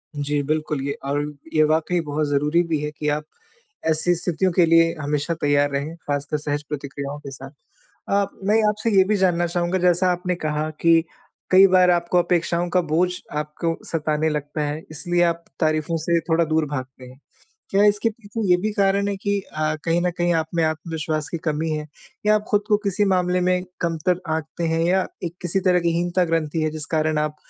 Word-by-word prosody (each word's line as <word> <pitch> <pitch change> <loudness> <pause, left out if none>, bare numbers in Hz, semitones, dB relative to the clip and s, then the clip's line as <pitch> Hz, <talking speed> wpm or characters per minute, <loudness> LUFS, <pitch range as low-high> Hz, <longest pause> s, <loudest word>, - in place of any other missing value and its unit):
जी, 145 0 -1
बिल्कुल 155 -1 -1
ये 140 - -1
अ, 140 - -1 0.4
ये 155 - +4
वाक़ई 160 +3 +1
बहुत 150 +1 -1
ज़रूरी 150 +4 +2
भी 160 -2 0
है 150 0 -3
कि 150 0 -5
आप 150 +1 -1 0.6
ऐसी 160 +3 +2
स्थितियों 175 +2 0
के 175 0 +5
लिए 165 0 +4
हमेशा 145 +3 -1
तैयार 145 0 +3
रहें, 140 +4 -3
ख़ासकर 145 -1 -3
सहज 145 0 -3
प्रतिक्रियाओं 140 0 -5
के 140 -2 -9
साथ। 135 0 -10 0.6
अ, 200 0 +3 0.2
मैं 210 +3 +3
आपसे 210 +2 -1
ये 190 - +8
भी 215 - +3
जानना 175 -2 +2
चाहूँगा 175 +1 0
जैसा 180 +1 +3
आपने 180 0 -1
कहा 155 -2 -2
कि 165 -1 +5 0.5
कई 190 +1 +8
बार 185 -1 +5
आपको 175 0 +1
अपेक्षाओं 175 0 0
का 180 +1 +2
बोझ 180 +3 +2 0.3
आपको 150 +2 -2
सताने 155 -1 0
लगता 150 0 -3
है 145 +2 -3
इसलिए 175 +3 -1
आप 170 -1 0 0.2
तारीफ़ों 155 +1 +1
से 170 -1 +3
थोड़ा 165 +1 +3
दूर 160 0 +1
भागते 130 -3 -6
हैं। 130 +1 -14 0.5
क्या 200 +1 +4
इसके 210 +2 +3
पीछे 225 0 -7
ये - - +7
भी 215 +2 -1
कारण 200 -1 +2
है 200 - -1
कि 200 +1 -1 0.2
अ, 155 0 0
कहीं 170 +1 +2
न 180 0 +1
कहीं 175 0 +2
आप 160 -1 0
में 165 - +2
आत्मविश्वास 155 -1 -3
की 170 - -3
कमी 155 +2 -1
है 150 -1 -3 0.4
या 210 0 +5
आप 210 0 -1
ख़ुद 205 -1 +3
को 210 - +5
किसी 200 +2 +1
मामले 180 0 +1
में 180 0 +1 0.2
कमतर 170 +1 0
आंकते 160 +2 -5
हैं? 165 0 0
या 185 +2 +2 0.2
एक 170 -1 -4
किसी 175 +2 0
तरह 180 0 +4
की 170 -1 +1
हीनता-ग्रंथि 165 -3 0
है 155 - +1
जिस 155 -1 -5
कारण 155 0 +1
आप 150 0 -1
165 Hz, 200 wpm, -22 LUFS, 150-180 Hz, 0.6 s, ये